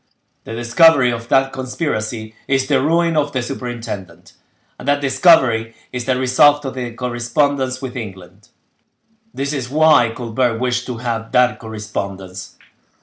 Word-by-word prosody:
The 115 - -6
discovery 125 +3 +4
of 115 0 -5
that 135 +1 +2
conspiracy 115 -5 -4
is 135 -1 +1
the 135 -1 +2
ruin 165 +3 +2
of 145 -1 0
the 130 -2 -1
superintendent, 120 -6 -7 0.5
and - - -9
that 145 0 +3
discovery 130 -6 +3 0.2
is 125 -1 -4
the 130 - +1
result 145 +3 +4
of 135 - -4
the 125 -2 -5
correspondence 130 +2 -1
with 130 -2 -5
England: 100 -2 -9 0.8
this 140 +2 -3
is 130 -4 -4
why 155 -4 +4
Colbert 115 0 -1
wished 125 0 -1
to 125 -2 -4
have 115 -1 -4
that 125 0 +3
correspondence. 100 -4 -7
125 Hz, 145 wpm, -18 LUFS, 115-135 Hz, 0.8 s, discovery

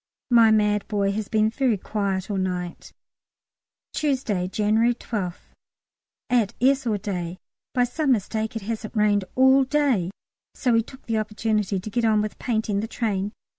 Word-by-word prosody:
My 230 -2 +7
mad 210 -1 +2
boy 200 -2 +1
has 210 0 -3
been 215 0 +2
very 250 -3 +1
quiet 195 -1 -2
all 200 - -1
night. 180 -2 -3 1.0
Tuesday, 255 -11 0
January 220 +4 +2
12th. 195 -7 -5 0.8
At 235 -5 +1
S. 265 0 +3
all 215 -2 +1
day. 180 -3 -4 0.4
By 250 - +4
some 275 +4 0
mistake 220 +1 -2
it 225 - -4
hasn't 220 +1 -5
rained 205 -2 +2
all 265 +1 +6
day, 265 - +1 0.5
so 250 -3 +1
we 230 - +4
took 260 +4 -13
the 225 -1 0
opportunity 210 -2 -1
to 195 - -7
get 240 +1 0
on 220 -2 +3
with 210 0 -3
painting 220 -4 -1
the 220 - -2
train. 205 -4 -2
215 Hz, 160 wpm, -24 LUFS, 200-240 Hz, 1.0 s, My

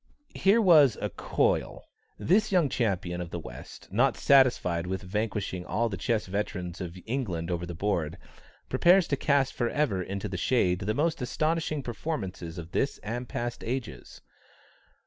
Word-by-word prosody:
Here 200 +4 +4
was 150 - +6
"a - - -3
coil;" - - 0 0.3
this 210 +5 +2
young 175 -7 +3
champion 90 -8 -1
of 85 - -5
the 85 - -5
West, - - -10
not - - +3
satisfied 120 -11 +3
with 95 +2 -3
vanquishing 100 -2 -2
all 115 +5 0
the 100 - -4
chess 105 +4 -1
veterans 95 -3 -4
of 90 0 -6
England 95 -9 -2
over 85 0 -2
the 85 - -6
board, 85 -3 -1 0.5
prepares 180 0 +4
to 140 - +2
cast 140 -1 +1
for 120 -1 -1
ever 130 -11 0
into 100 +3 -4
the 95 -2 -4
shade 90 -4 +2
the 105 +3 -2
most 160 +1 0
astonishing 155 +3 -1
performances 100 - -5
of 85 0 -8
this 140 - 0
and 120 +4 -4
past 120 0 -4
ages. 125 0 -5
110 Hz, 160 wpm, -28 LUFS, 90-140 Hz, 0.5 s, was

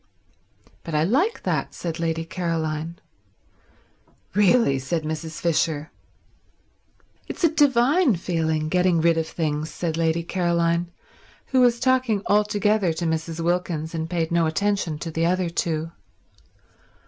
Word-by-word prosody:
"But 165 - -5
I 150 - +3
like 290 - +1
that," - - -2
said 165 -1 -4
Lady 165 -1 -1
Caroline. 165 -2 -3 1.4
"Really—" 205 - +3
said 155 +5 -2
Mrs. 155 +1 -5
Fisher. 155 -2 0 1.4
"It's - - -7
a 330 - +5
divine 285 - +4
feeling, 160 -3 -1
getting 180 0 +2
rid 165 +1 +3
of 160 - -2
things," 155 -2 -2
said 165 -2 -3
Lady 165 0 +1
Caroline, 170 -1 0 0.6
who 260 -1 +3
was 240 -1 +4
talking 255 -5 +1
altogether 210 -2 +2
to 170 +2 -4
Mrs. 160 0 -2
Wilkins 170 -2 -1
and 160 0 -3
paid 165 -2 -1
no 170 -1 +2
attention 195 -1 -1
to 165 +2 -6
the 165 +1 0
other 180 -1 0
two. 165 -1 -2
170 Hz, 130 wpm, -23 LUFS, 160-200 Hz, 1.4 s, a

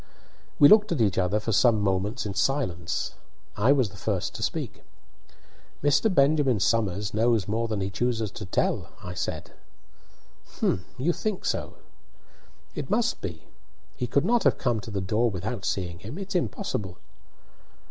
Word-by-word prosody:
We 145 - +9
looked 210 +3 +6
at 165 - 0
each 105 -5 +2
other 95 +3 +1
for 110 +2 -3
some 110 +1 +4
moments 100 +4 0
in 100 - -3
silence. 95 - -1 0.4
I 110 +6 +3
was 130 -7 +3
the 95 - -13
first - - -2
to - - -7
speak. - - -3 1.0
"Mr. 145 +9 +3
Benjamin 140 - +3
Somers 105 -1 0
knows 110 -2 +2
more 115 +2 0
than 110 -3 -2
he 95 +1 -2
chooses 110 -1 -1
to 105 - -8
tell," - - 0
I 90 - -6
said. - - -4 1.1
"Humph! 90 - +1 0.2
do 125 - -5
you 175 +4 +3
think 215 0 -3
so?" - - -2 1.0
"It - - -5
must - - +1
be. - - -6 0.5
He 125 - -3
could 140 +6 +1
not 235 +3 +3
have - - +3
come 120 -4 0
to 105 - -8
the 100 -2 -2
door 110 +5 +1
without 100 +2 -4
seeing 85 -3 -2
him; 110 - -8
it's 195 0 -5
impossible." 110 - -2
110 Hz, 165 wpm, -26 LUFS, 100-135 Hz, 1.1 s, We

